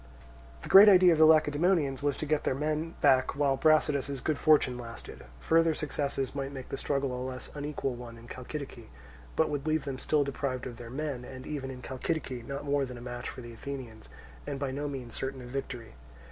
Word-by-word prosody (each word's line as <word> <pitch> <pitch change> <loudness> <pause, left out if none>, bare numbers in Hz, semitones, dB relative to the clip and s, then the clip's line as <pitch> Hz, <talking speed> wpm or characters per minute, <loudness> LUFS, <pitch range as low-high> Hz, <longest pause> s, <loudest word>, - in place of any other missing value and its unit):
The - - -7
great 200 +2 +10
idea 185 -3 +7
of 160 - 0
the 160 - +8
Lacedaemonians 155 -2 +3
was 145 -1 0
to - - -3
get 155 0 +2
back - - -18
their - - +1
men 155 +3 -2 0.4
while 140 -1 +2
Brasidas's 140 -2 +2
good 150 +2 -1
fortune 150 -5 +4
lasted: 115 -1 -9 0.2
further 165 - +3
successes 140 -3 -2
might 140 -1 -3
make 135 -2 -8
the - - -4
struggle 140 -2 -1
a 125 - -4
less 130 -1 -6
unequal 145 -2 -3
one 120 -1 -9
in 115 +1 -13
Chalcidice, 130 -2 -7 0.5
but 160 - +3
would 145 +1 -3
leave 155 -2 +1
them 135 -2 -4
still 150 -2 +2
deprived 135 -2 -3
of 120 -3 -7
their 120 -1 -9
men, 135 -1 -4
and 130 +1 -9
even 140 -3 -4
in 125 -1 -8
Chalcidice 130 -3 -3
not 140 +1 -5
more 140 0 +1
than 125 -2 -6
a - - -8
match 120 0 -6
for - - -8
the 120 -1 -9
Athenians 120 -3 -8 0.4
and 145 -1 -3
by 135 -1 -2
no 145 +2 -3
means 130 -5 -6
certain 135 -1 -4
of 120 - -9
victory. 125 -3 -5
140 Hz, 210 wpm, -30 LUFS, 125-150 Hz, 0.5 s, great